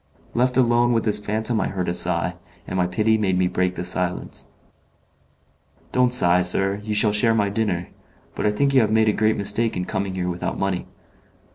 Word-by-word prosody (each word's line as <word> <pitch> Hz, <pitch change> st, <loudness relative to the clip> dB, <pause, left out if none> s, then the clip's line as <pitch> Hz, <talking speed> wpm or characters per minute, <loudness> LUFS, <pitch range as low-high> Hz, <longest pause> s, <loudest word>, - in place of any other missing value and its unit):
Left 125 Hz, +1 st, +1 dB
alone 120 Hz, -1 st, +3 dB
with 115 Hz, -, 0 dB
this 105 Hz, -1 st, 0 dB
phantom 110 Hz, +2 st, -1 dB
I -, -, -1 dB
heard 95 Hz, -2 st, -4 dB
a 85 Hz, -, -1 dB
sigh, 90 Hz, 0 st, +1 dB, 0.3 s
and -, -, -6 dB
my 90 Hz, -1 st, +1 dB
pity 110 Hz, +4 st, +1 dB
made 95 Hz, -3 st, 0 dB
me 90 Hz, -, +1 dB
break 90 Hz, 0 st, -1 dB
the -, -, -5 dB
silence. 90 Hz, 0 st, -3 dB, 1.4 s
"Don't 125 Hz, -1 st, +2 dB
sigh, 90 Hz, -7 st, +5 dB
sir, 95 Hz, +2 st, 0 dB
you 105 Hz, 0 st, -4 dB
shall 105 Hz, 0 st, +4 dB
share 115 Hz, +2 st, +3 dB
my 105 Hz, -2 st, +1 dB
dinner. 100 Hz, -5 st, -2 dB, 0.4 s
But -, -, -2 dB
I -, -, +2 dB
think 140 Hz, +6 st, 0 dB
you 130 Hz, -, +5 dB
have 110 Hz, -, +1 dB
made 110 Hz, 0 st, +2 dB
a -, -, +1 dB
great 110 Hz, +1 st, +1 dB
mistake 105 Hz, +2 st, +1 dB
in 90 Hz, -, -3 dB
coming 95 Hz, 0 st, -4 dB
here 90 Hz, -1 st, -3 dB
without 90 Hz, +1 st, -4 dB
money." 95 Hz, -2 st, -3 dB
105 Hz, 205 wpm, -22 LUFS, 90-110 Hz, 1.4 s, sigh